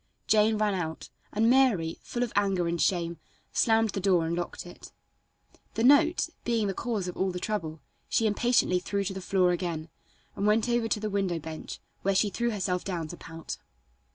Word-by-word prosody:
Jane 215 Hz, 0 st, +4 dB
ran 210 Hz, -1 st, +1 dB
out, 160 Hz, -4 st, -4 dB, 0.2 s
and 220 Hz, +2 st, +2 dB
Mary, 230 Hz, -11 st, +3 dB
full 240 Hz, -, -2 dB
of 245 Hz, -, -4 dB
anger 195 Hz, -4 st, +2 dB
and 170 Hz, 0 st, -1 dB
shame, 170 Hz, -3 st, 0 dB, 0.3 s
slammed 225 Hz, -1 st, +3 dB
the -, -, -3 dB
door 180 Hz, -3 st, +3 dB
and 165 Hz, +1 st, -1 dB
locked 175 Hz, 0 st, -4 dB
it. 175 Hz, -, -12 dB, 0.8 s
The 225 Hz, -, 0 dB
note, 315 Hz, +6 st, +5 dB
being 230 Hz, -3 st, +1 dB
the 195 Hz, -, -1 dB
cause 215 Hz, -4 st, -2 dB
of 180 Hz, -, -5 dB
all 190 Hz, -, 0 dB
the 180 Hz, -1 st, -4 dB
trouble, 165 Hz, -7 st, -3 dB, 0.3 s
she 225 Hz, -, +2 dB
impatiently 215 Hz, -3 st, +2 dB
threw 200 Hz, +2 st, -2 dB
to 195 Hz, 0 st, -3 dB
the 190 Hz, -, -6 dB
floor 185 Hz, -1 st, +2 dB
again, 170 Hz, -3 st, -3 dB, 0.5 s
and 200 Hz, +1 st, 0 dB
went 215 Hz, +2 st, +3 dB
over 240 Hz, -1 st, +1 dB
to 215 Hz, -, 0 dB
the 215 Hz, 0 st, -3 dB
window 195 Hz, -4 st, 0 dB
bench, 160 Hz, -, -7 dB, 0.2 s
where 195 Hz, 0 st, +1 dB
she 205 Hz, +1 st, +3 dB
threw 235 Hz, +3 st, 0 dB
herself 185 Hz, -4 st, -1 dB
down 170 Hz, -5 st, -3 dB
to 175 Hz, -, -7 dB
pout. 165 Hz, 0 st, -7 dB
195 Hz, 195 wpm, -28 LUFS, 175-220 Hz, 0.8 s, note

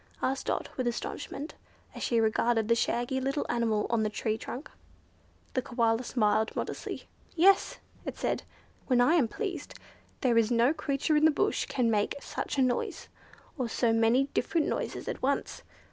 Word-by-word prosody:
asked 270 Hz, +1 st, -1 dB
Dot -, -, -1 dB
with 255 Hz, -2 st, 0 dB
astonishment, 280 Hz, +5 st, -4 dB, 0.4 s
as -, -, -8 dB
she 235 Hz, -, +2 dB
regarded 225 Hz, 0 st, +2 dB
the 230 Hz, -, +5 dB
shaggy 240 Hz, +3 st, 0 dB
little 275 Hz, +3 st, -1 dB
animal 230 Hz, -3 st, +1 dB
on 235 Hz, -2 st, +2 dB
the 215 Hz, -, +1 dB
tree 215 Hz, +1 st, -1 dB
trunk. 245 Hz, +5 st, -7 dB, 0.8 s
The 255 Hz, -, +1 dB
Koala 235 Hz, -1 st, +1 dB
smiled 220 Hz, -3 st, +1 dB
modestly. -, -, -4 dB, 0.3 s
"Yes!" 385 Hz, +4 st, +4 dB, 0.3 s
it -, -, -6 dB
said; -, -, -1 dB, 0.5 s
"when 250 Hz, -2 st, +3 dB
I 245 Hz, +6 st, +5 dB
am 305 Hz, -9 st, +4 dB
pleased 390 Hz, -, -5 dB, 0.5 s
there 240 Hz, -4 st, +4 dB
is 225 Hz, -1 st, +2 dB
no 240 Hz, +4 st, +4 dB
creature 300 Hz, 0 st, 0 dB
in 300 Hz, -, +4 dB
the -, -, +8 dB
bush 360 Hz, +7 st, 0 dB
can 240 Hz, -3 st, +1 dB
make 210 Hz, -1 st, +1 dB
such 280 Hz, -, -4 dB
a 265 Hz, -, +4 dB
noise, 250 Hz, -1 st, -1 dB, 0.5 s
or 245 Hz, -2 st, -1 dB
so 230 Hz, 0 st, +2 dB
many 225 Hz, +4 st, +4 dB
different 330 Hz, -3 st, +1 dB
noises -, -, -3 dB
at -, -, -4 dB
once. 275 Hz, +2 st, -1 dB
245 Hz, 170 wpm, -29 LUFS, 225-275 Hz, 0.8 s, the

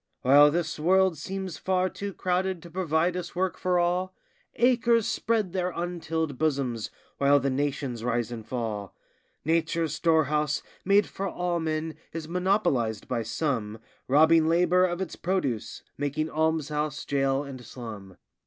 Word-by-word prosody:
While 145 Hz, +3 st, +7 dB
this 160 Hz, 0 st, -2 dB
world 190 Hz, +2 st, +3 dB
seems 185 Hz, +2 st, -5 dB
far 185 Hz, 0 st, +1 dB
too 200 Hz, +2 st, -5 dB
crowded 185 Hz, -1 st, -1 dB
to 170 Hz, -, -11 dB
provide 175 Hz, 0 st, +1 dB
us 180 Hz, -1 st, -5 dB
work 185 Hz, 0 st, 0 dB
for 180 Hz, -1 st, 0 dB
all, 180 Hz, +2 st, 0 dB, 0.4 s
Acres 235 Hz, -2 st, +3 dB
spread 215 Hz, -6 st, 0 dB
their 180 Hz, -1 st, 0 dB
untilled 165 Hz, -4 st, -3 dB
bosoms, 135 Hz, -7 st, 0 dB, 0.3 s
while 140 Hz, +1 st, +5 dB
the 135 Hz, 0 st, 0 dB
nations 135 Hz, -3 st, -2 dB
rise 120 Hz, -1 st, -1 dB
and 115 Hz, -2 st, -6 dB
fall. 110 Hz, -4 st, -4 dB, 0.5 s
Nature's 165 Hz, -1 st, +1 dB
storehouse, 150 Hz, -3 st, +1 dB, 0.2 s
made 200 Hz, +2 st, +4 dB
for 195 Hz, -, -4 dB
all 175 Hz, -1 st, -1 dB
men, 160 Hz, 0 st, -2 dB, 0.2 s
is 160 Hz, -1 st, -5 dB
monopolized 170 Hz, -, 0 dB
by 120 Hz, -2 st, -1 dB
some, 115 Hz, -2 st, -2 dB, 0.3 s
Robbing 160 Hz, +3 st, +5 dB
labor 180 Hz, +2 st, +4 dB
of 175 Hz, 0 st, -2 dB
its 185 Hz, -, -4 dB
produce, 155 Hz, -, -2 dB, 0.2 s
making 145 Hz, +2 st, -1 dB
almshouse, 155 Hz, -2 st, -1 dB
jail, 135 Hz, 0 st, +1 dB
and 135 Hz, -3 st, -9 dB
slum. 105 Hz, -6 st, -9 dB
160 Hz, 145 wpm, -27 LUFS, 140-180 Hz, 0.5 s, While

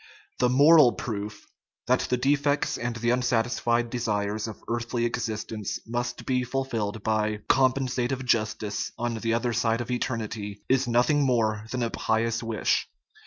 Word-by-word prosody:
The 125 Hz, -, +3 dB
moral 140 Hz, 0 st, +7 dB
proof 105 Hz, -2 st, -5 dB, 0.4 s
that 125 Hz, +2 st, +3 dB
the 125 Hz, -, +2 dB
defects 145 Hz, +2 st, +1 dB
and 120 Hz, 0 st, -3 dB
the 120 Hz, +1 st, 0 dB
unsatisfied 120 Hz, -1 st, +1 dB
desires 105 Hz, -3 st, -1 dB
of 110 Hz, -, -9 dB
earthly 120 Hz, 0 st, -1 dB
existence 110 Hz, -3 st, -3 dB
must 120 Hz, +1 st, -3 dB
be 125 Hz, -1 st, +1 dB
fulfilled 115 Hz, -5 st, -3 dB
by 110 Hz, -1 st, 0 dB
" -, -, -40 dB
compensative 130 Hz, -1 st, +1 dB
justice 110 Hz, -3 st, -1 dB
" -, -, -40 dB
on 120 Hz, -1 st, -2 dB
the 115 Hz, +1 st, 0 dB
other 120 Hz, 0 st, 0 dB
side 115 Hz, 0 st, +1 dB
of 120 Hz, 0 st, -4 dB
eternity 110 Hz, -4 st, -3 dB
is 130 Hz, 0 st, +2 dB
nothing 125 Hz, +5 st, +3 dB
more 110 Hz, -4 st, +1 dB
than 125 Hz, 0 st, -2 dB
a 115 Hz, -, -1 dB
pious 115 Hz, +1 st, 0 dB
wish. 115 Hz, -2 st, 0 dB
120 Hz, 155 wpm, -26 LUFS, 110-125 Hz, 0.4 s, moral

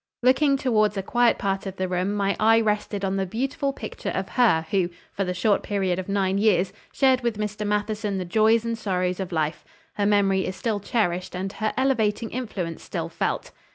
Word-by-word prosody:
Looking 275 Hz, +2 st, +4 dB
towards 215 Hz, -6 st, +2 dB
a 195 Hz, -, -1 dB
quiet 240 Hz, +4 st, +3 dB
part 195 Hz, 0 st, -2 dB
of 190 Hz, -, -5 dB
the 185 Hz, 0 st, -2 dB
room 185 Hz, +3 st, -1 dB
my 200 Hz, -1 st, +1 dB
eye 225 Hz, +1 st, +5 dB
rested 210 Hz, -2 st, -1 dB
on 195 Hz, 0 st, -1 dB
the 195 Hz, -, 0 dB
beautiful 275 Hz, -, -1 dB
picture -, -, -6 dB
of -, -, -3 dB
her 215 Hz, -11 st, +3 dB
who, 185 Hz, -3 st, +2 dB, 0.2 s
for 195 Hz, -, -1 dB
the 180 Hz, -1 st, -2 dB
short 200 Hz, +3 st, +2 dB
period 190 Hz, -3 st, -1 dB
of 185 Hz, -, -6 dB
nine 195 Hz, -1 st, +1 dB
years, 195 Hz, -3 st, +2 dB, 0.2 s
shared 260 Hz, -2 st, +3 dB
with 235 Hz, -3 st, -1 dB
Mr. 210 Hz, 0 st, -3 dB
Matheson 210 Hz, 0 st, -1 dB
the 185 Hz, -, -3 dB
joys 220 Hz, +4 st, +3 dB
and 230 Hz, 0 st, -1 dB
sorrows 185 Hz, -4 st, -1 dB
of 190 Hz, -1 st, -4 dB
life. 155 Hz, -2 st, -1 dB, 0.3 s
Her 205 Hz, -1 st, 0 dB
memory 195 Hz, -2 st, +2 dB
is 185 Hz, -, -4 dB
still 210 Hz, +2 st, -1 dB
cherished 185 Hz, -4 st, -1 dB
and 190 Hz, +2 st, -3 dB
her 215 Hz, -1 st, -1 dB
elevating 230 Hz, -4 st, +1 dB
influence 195 Hz, -9 st, -4 dB
still -, -, -4 dB
felt. -, -, -2 dB
205 Hz, 200 wpm, -25 LUFS, 190-225 Hz, 0.3 s, eye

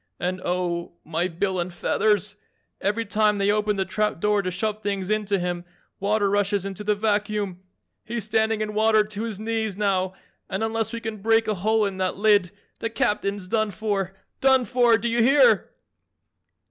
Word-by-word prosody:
And 185 Hz, +2 st, -2 dB
oh, 175 Hz, -1 st, -2 dB
my 165 Hz, +3 st, -1 dB
bill 185 Hz, +2 st, -2 dB
and 175 Hz, +1 st, -2 dB
feathers! 205 Hz, +3 st, +1 dB, 0.5 s
Every 210 Hz, +3 st, 0 dB
time 210 Hz, 0 st, +2 dB
they 200 Hz, 0 st, +2 dB
open 210 Hz, 0 st, +1 dB
the 190 Hz, -1 st, 0 dB
trap 210 Hz, 0 st, -1 dB
door 210 Hz, +2 st, +2 dB
to 185 Hz, -, -2 dB
shove 215 Hz, +4 st, -2 dB
things 200 Hz, -1 st, -2 dB
in 215 Hz, 0 st, +1 dB
to 200 Hz, 0 st, +1 dB
him, 175 Hz, -1 st, -2 dB, 0.4 s
water 205 Hz, +1 st, +1 dB
rushes 200 Hz, -1 st, +1 dB
into 195 Hz, +1 st, -5 dB
the 210 Hz, 0 st, +1 dB
vacuum. 205 Hz, -3 st, -1 dB, 0.4 s
He's 235 Hz, 0 st, -4 dB
standing 220 Hz, +1 st, +1 dB
in 210 Hz, 0 st, -2 dB
water 215 Hz, 0 st, +4 dB
to 210 Hz, 0 st, -7 dB
his 225 Hz, -3 st, -4 dB
knees 220 Hz, -2 st, -2 dB
now 190 Hz, -2 st, 0 dB, 0.3 s
and 195 Hz, +2 st, -2 dB
unless 225 Hz, 0 st, -1 dB
we 230 Hz, -1 st, -5 dB
can 225 Hz, -1 st, -4 dB
break 225 Hz, +2 st, +2 dB
a 215 Hz, -, +1 dB
hole 215 Hz, +3 st, +1 dB
in 195 Hz, -2 st, -3 dB
that 185 Hz, -1 st, -1 dB
lid 205 Hz, -3 st, +4 dB, 0.3 s
the 230 Hz, -, -2 dB
Captain's 205 Hz, -5 st, -1 dB
done 215 Hz, +1 st, +1 dB
for 200 Hz, -2 st, -2 dB, 0.2 s
done 265 Hz, -2 st, +4 dB
for, 240 Hz, -2 st, +4 dB
do 235 Hz, -, -2 dB
you 235 Hz, 0 st, +1 dB
hear?" 290 Hz, -, +5 dB
210 Hz, 185 wpm, -24 LUFS, 195-220 Hz, 0.5 s, hear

